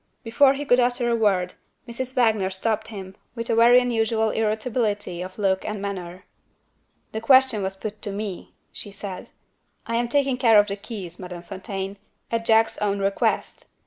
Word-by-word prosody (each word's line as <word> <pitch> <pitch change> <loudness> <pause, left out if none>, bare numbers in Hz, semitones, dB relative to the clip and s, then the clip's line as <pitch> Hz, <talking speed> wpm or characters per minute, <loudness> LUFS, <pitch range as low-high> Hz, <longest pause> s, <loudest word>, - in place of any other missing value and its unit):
Before 265 +4 +4
he 290 +1 -4
could 250 -2 +4
utter 245 -1 +1
a - - +3
word, 190 -5 +1 0.3
Mrs. 255 +2 -5
Wagner 220 -6 +2
stopped 215 +3 -2
him, 190 -3 -8 0.2
with 230 -1 -3
a - - +2
very 240 +2 +7
unusual 225 -2 +1
irritability 215 -4 -1
of 185 +1 -7
look 190 -2 +1
and 210 -1 -4
manner. 185 -2 -6 0.9
"The 220 - -4
question 260 -3 +5
was 190 0 -3
put 210 +1 -7
to 205 - -4
me," 200 -2 -6 0.2
she - - -7
said. 200 -2 -7 0.6
"I 230 0 -1
am 240 0 0
taking 275 -1 +1
care 230 -4 +5
of 205 0 +5
the 200 - -2
keys, 200 -4 -8
Madame 180 -2 -8
Fontaine, 195 +1 -6 0.3
at 230 0 -1
Jack's 225 0 +3
own 200 -1 0
request. 195 0 -1
215 Hz, 175 wpm, -24 LUFS, 195-235 Hz, 0.9 s, very